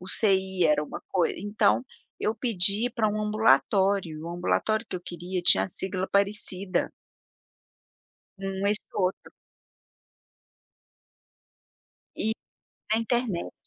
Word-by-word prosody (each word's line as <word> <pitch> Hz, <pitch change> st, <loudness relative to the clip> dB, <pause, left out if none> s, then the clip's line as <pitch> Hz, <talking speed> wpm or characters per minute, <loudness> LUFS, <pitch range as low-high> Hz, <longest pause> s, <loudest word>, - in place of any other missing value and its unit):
UCI 190 Hz, -1 st, 0 dB
era 150 Hz, -1 st, +3 dB
uma -, -, -8 dB
coisa 180 Hz, -3 st, +1 dB
então, 175 Hz, -, +1 dB, 0.3 s
eu 215 Hz, -, 0 dB
pedi 215 Hz, -1 st, +3 dB
para 220 Hz, -4 st, +2 dB
um 215 Hz, +1 st, -2 dB
ambulatório, 200 Hz, -4 st, +2 dB
e -, -, -9 dB
o 165 Hz, -, -6 dB
ambulatório 190 Hz, +5 st, 0 dB
que -, -, -6 dB
eu -, -, -7 dB
queria 175 Hz, +1 st, -5 dB
tinha -, -, +6 dB
a -, -, -6 dB
sigla 190 Hz, +1 st, -3 dB
parecida. 200 Hz, -2 st, 0 dB, 1.5 s
Hum, 195 Hz, 0 st, -3 dB
esse 210 Hz, +1 st, +2 dB
outro. 185 Hz, -1 st, -2 dB, 2.8 s
E 220 Hz, -, 0 dB, 0.6 s
na 220 Hz, -, +3 dB
internet, 230 Hz, -6 st, -2 dB
195 Hz, 115 wpm, -27 LUFS, 180-215 Hz, 2.8 s, tinha